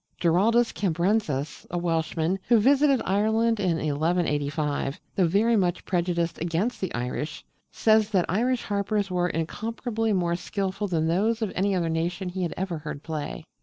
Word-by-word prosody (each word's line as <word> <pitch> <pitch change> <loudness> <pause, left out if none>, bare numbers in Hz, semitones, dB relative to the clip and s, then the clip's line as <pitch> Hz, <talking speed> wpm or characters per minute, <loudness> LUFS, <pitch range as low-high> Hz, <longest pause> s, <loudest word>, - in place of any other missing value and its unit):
Giraldus 215 +8 +3
Cambrensis, 175 -5 -1
a 175 - -2
Welshman, 165 +1 0
who 240 - +6
visited 275 +3 +4
Ireland 220 +3 +2
in 180 -4 +1
1185, 150 -2 -1 0.2
though 185 -3 +3
very 215 +7 +3
much 180 -4 0
prejudiced 170 -2 -1
against 175 +9 -1
the 190 - -2
Irish, 125 +5 -4 0.3
says 215 -1 +3
that 190 -5 +2
Irish 240 +7 +1
harpers 200 -1 -1
were 180 0 +1
incomparably 225 +7 -2
more 175 -3 +1
skilful 195 +2 -3
than 165 -4 0
those 215 +7 +1
of 210 - -2
any 195 +1 +1
other 170 -2 0
nation 175 +3 -2
he 185 +1 -4
had 175 - -2
ever 180 -3 -3
heard 150 -1 -7
play. 155 -3 -5
180 Hz, 155 wpm, -26 LUFS, 165-215 Hz, 0.3 s, who